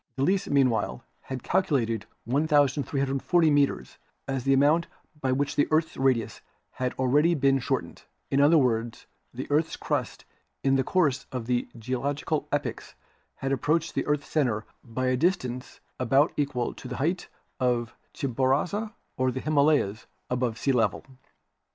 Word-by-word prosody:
Delesse 185 Hz, +8 st, +1 dB
meanwhile 125 Hz, -, +1 dB, 0.2 s
had 130 Hz, -2 st, -5 dB
calculated 125 Hz, -, 0 dB, 0.2 s
1,340 145 Hz, +3 st, +2 dB
meters 140 Hz, -, +1 dB, 0.3 s
as 135 Hz, -2 st, -2 dB
the 135 Hz, -, +4 dB
amount 150 Hz, +5 st, +3 dB, 0.3 s
by 130 Hz, -, +1 dB
which 140 Hz, +2 st, 0 dB
the 145 Hz, -, +3 dB
earth's 160 Hz, +1 st, +1 dB
radius 120 Hz, -5 st, 0 dB, 0.3 s
had 130 Hz, -1 st, -2 dB
already 145 Hz, +6 st, +3 dB
been 135 Hz, -2 st, +3 dB
shortened; 125 Hz, -, -3 dB, 0.3 s
in 135 Hz, -, +3 dB
other 155 Hz, +3 st, +6 dB
words, 120 Hz, -4 st, 0 dB, 0.3 s
the 130 Hz, +2 st, -5 dB
earth's 155 Hz, +2 st, +1 dB
crust -, -, -3 dB, 0.4 s
in 135 Hz, 0 st, +3 dB
the 135 Hz, -, +2 dB
course 145 Hz, -4 st, +1 dB
of 125 Hz, -3 st, -4 dB
the 120 Hz, 0 st, 0 dB
geological 140 Hz, +6 st, -2 dB
epochs -, -, -3 dB, 0.4 s
had 135 Hz, -, -3 dB
approached 155 Hz, +4 st, 0 dB
the -, -, -2 dB
earth's 150 Hz, -1 st, 0 dB
center 120 Hz, -8 st, 0 dB, 0.2 s
by 125 Hz, +2 st, -3 dB
a 130 Hz, 0 st, +2 dB
distance 130 Hz, -5 st, -1 dB, 0.2 s
about 135 Hz, +5 st, +3 dB
equal 140 Hz, -4 st, -1 dB
to -, -, -10 dB
the -, -, -5 dB
height 170 Hz, +7 st, -1 dB, 0.3 s
of 120 Hz, -2 st, 0 dB, 0.2 s
Chimborazo 140 Hz, -, 0 dB, 0.2 s
or 130 Hz, 0 st, +2 dB
the 130 Hz, -, -4 dB
Himalayas 145 Hz, -8 st, +2 dB, 0.2 s
above 125 Hz, -2 st, 0 dB
sea 135 Hz, -, +1 dB
level. 115 Hz, -6 st, +1 dB
135 Hz, 145 wpm, -27 LUFS, 125-150 Hz, 0.4 s, other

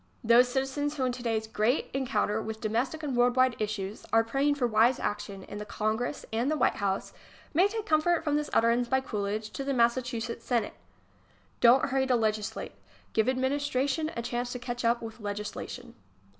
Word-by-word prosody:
Those 235 Hz, +2 st, +6 dB
citizens 275 Hz, +3 st, -1 dB
who 265 Hz, -, 0 dB
in 250 Hz, -, +1 dB
today's 230 Hz, -3 st, -2 dB
great 220 Hz, +4 st, 0 dB
encounter 220 Hz, -5 st, 0 dB
with 220 Hz, 0 st, -5 dB
domestic 245 Hz, +8 st, -1 dB
and 275 Hz, -4 st, -2 dB
world 245 Hz, 0 st, +3 dB
wide 255 Hz, -1 st, +4 dB
issues 210 Hz, -1 st, -3 dB
are 225 Hz, 0 st, +5 dB
praying 275 Hz, +5 st, +1 dB
for 270 Hz, -4 st, 0 dB
wise 230 Hz, +2 st, +3 dB
action 200 Hz, -2 st, -4 dB
in 205 Hz, -, -8 dB
the -, -, -4 dB
Congress 220 Hz, +6 st, -2 dB
and 235 Hz, +5 st, +1 dB
the 310 Hz, -, +1 dB
White -, -, +2 dB
House 195 Hz, -1 st, -2 dB, 0.4 s
may 355 Hz, +6 st, +5 dB
take 435 Hz, +1 st, -4 dB
comfort 325 Hz, 0 st, +2 dB
from 295 Hz, -1 st, +1 dB
this 300 Hz, 0 st, -1 dB
utterance 235 Hz, +1 st, +3 dB
by 265 Hz, +2 st, +2 dB
Coolidge 215 Hz, -3 st, -3 dB
to 275 Hz, -, -4 dB
the 275 Hz, 0 st, -1 dB
Massachusetts 235 Hz, -1 st, 0 dB
Senate:... 235 Hz, -4 st, 0 dB, 0.9 s
Don 245 Hz, +2 st, +6 dB
t -, -, +2 dB
hurry 265 Hz, 0 st, +1 dB
to 255 Hz, -, +3 dB
legislate. 220 Hz, -1 st, -1 dB, 0.4 s
Give 220 Hz, +1 st, +2 dB
adminis 265 Hz, +3 st, 0 dB
tration 285 Hz, +5 st, 0 dB
a 235 Hz, -, -2 dB
chance 245 Hz, +1 st, -2 dB
to -, -, -3 dB
catch 245 Hz, 0 st, -5 dB
up 235 Hz, +1 st, +2 dB
ivith 225 Hz, 0 st, -8 dB
legislation. 210 Hz, +4 st, -6 dB
245 Hz, 190 wpm, -29 LUFS, 220-265 Hz, 0.9 s, Those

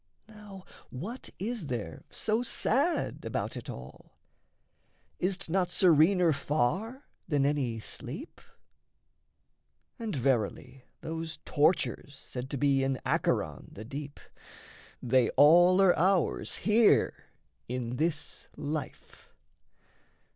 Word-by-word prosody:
Now 210 Hz, -3 st, -12 dB, 0.2 s
what 205 Hz, -, -7 dB
is 215 Hz, -4 st, -4 dB
there 105 Hz, -11 st, -5 dB
so 220 Hz, +2 st, 0 dB
sad 275 Hz, +6 st, 0 dB
about -, -, -3 dB
it -, -, -7 dB
all? -, -, -11 dB, 1.0 s
Is't 185 Hz, +1 st, -1 dB
not 180 Hz, +1 st, +1 dB
serener 175 Hz, 0 st, +4 dB
far 185 Hz, -, -1 dB, 0.2 s
than 145 Hz, -4 st, +1 dB
any 135 Hz, -6 st, 0 dB
sleep? -, -, -8 dB, 1.6 s
And, 225 Hz, -6 st, -3 dB
verily, 125 Hz, 0 st, -1 dB, 0.2 s
those 160 Hz, 0 st, -5 dB
tortures 145 Hz, -2 st, +1 dB
said 130 Hz, -1 st, -7 dB
to 140 Hz, -, -3 dB
be 135 Hz, 0 st, +2 dB
In 135 Hz, -1 st, -1 dB
Acheron, -, -, -1 dB
the 105 Hz, -, -9 dB
deep, 140 Hz, +3 st, -7 dB, 0.8 s
they 125 Hz, -1 st, +3 dB
all 175 Hz, +6 st, +7 dB
are 190 Hz, -2 st, +5 dB
ours 185 Hz, +1 st, +1 dB
Here 215 Hz, +3 st, +4 dB, 0.5 s
in 125 Hz, 0 st, -4 dB
this 155 Hz, -1 st, -3 dB
life. 150 Hz, +1 st, -6 dB
155 Hz, 105 wpm, -29 LUFS, 135-190 Hz, 1.6 s, all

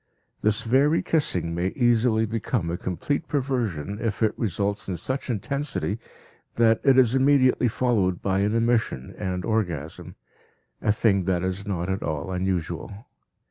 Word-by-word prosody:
This 110 Hz, +2 st, +1 dB
very 140 Hz, +7 st, +3 dB
kissing 90 Hz, -, 0 dB
may 85 Hz, +2 st, 0 dB
easily 120 Hz, -2 st, +3 dB
become 110 Hz, -5 st, -2 dB
a -, -, -1 dB
complete 140 Hz, -, -2 dB
perversion 115 Hz, -, -2 dB
if 115 Hz, -1 st, -1 dB
it 110 Hz, -, +2 dB
results 100 Hz, -1 st, -1 dB
in 90 Hz, -, -2 dB
such 130 Hz, -, -3 dB
intensity 120 Hz, -1 st, -2 dB, 0.6 s
that 115 Hz, -1 st, +3 dB
it 135 Hz, -2 st, +5 dB
is 125 Hz, -3 st, +5 dB
immediately 130 Hz, -2 st, +4 dB
followed 110 Hz, -7 st, +1 dB
by 95 Hz, -1 st, 0 dB
an 105 Hz, +3 st, +1 dB
emission 115 Hz, -, 0 dB
and 90 Hz, -1 st, -3 dB
orgasm 85 Hz, -9 st, -3 dB, 0.7 s
a 105 Hz, -, +2 dB
thing 100 Hz, -3 st, +2 dB
that 90 Hz, -2 st, 0 dB
is 95 Hz, +2 st, -3 dB
not 90 Hz, -3 st, -2 dB
at 95 Hz, 0 st, -2 dB
all 75 Hz, +4 st, -3 dB
unusual. 90 Hz, -1 st, -2 dB
105 Hz, 145 wpm, -25 LUFS, 95-120 Hz, 0.7 s, it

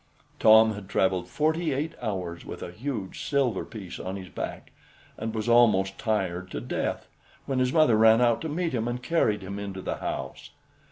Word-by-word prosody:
Tom 110 Hz, 0 st, +7 dB
had 100 Hz, -2 st, -9 dB
traveled 95 Hz, -2 st, +1 dB
forty 155 Hz, -, 0 dB
eight 150 Hz, +4 st, -2 dB
hours 90 Hz, -7 st, -4 dB
with -, -, -8 dB
a -, -, -6 dB
huge 110 Hz, -1 st, -5 dB
silver 135 Hz, -8 st, +1 dB
piece 100 Hz, -6 st, -8 dB
on 95 Hz, +1 st, -4 dB
his 95 Hz, -2 st, -8 dB
back, -, -, -6 dB, 0.4 s
and 110 Hz, +1 st, -4 dB
was 110 Hz, +1 st, -2 dB
almost 110 Hz, -5 st, +4 dB
tired 95 Hz, -5 st, -1 dB
to -, -, -4 dB
death, -, -, -3 dB, 0.4 s
when 135 Hz, -2 st, -1 dB
his 125 Hz, 0 st, +2 dB
mother 155 Hz, -7 st, +5 dB
ran 110 Hz, +1 st, +6 dB
out 120 Hz, -2 st, +3 dB
to 160 Hz, -, -3 dB
meet 165 Hz, +1 st, -2 dB
him, 115 Hz, -2 st, -1 dB
and 120 Hz, +1 st, -3 dB
carried 110 Hz, -11 st, +1 dB
him 100 Hz, +2 st, -5 dB
into 100 Hz, -2 st, -5 dB
the -, -, -3 dB
house. -, -, -5 dB
110 Hz, 185 wpm, -27 LUFS, 95-130 Hz, 0.4 s, Tom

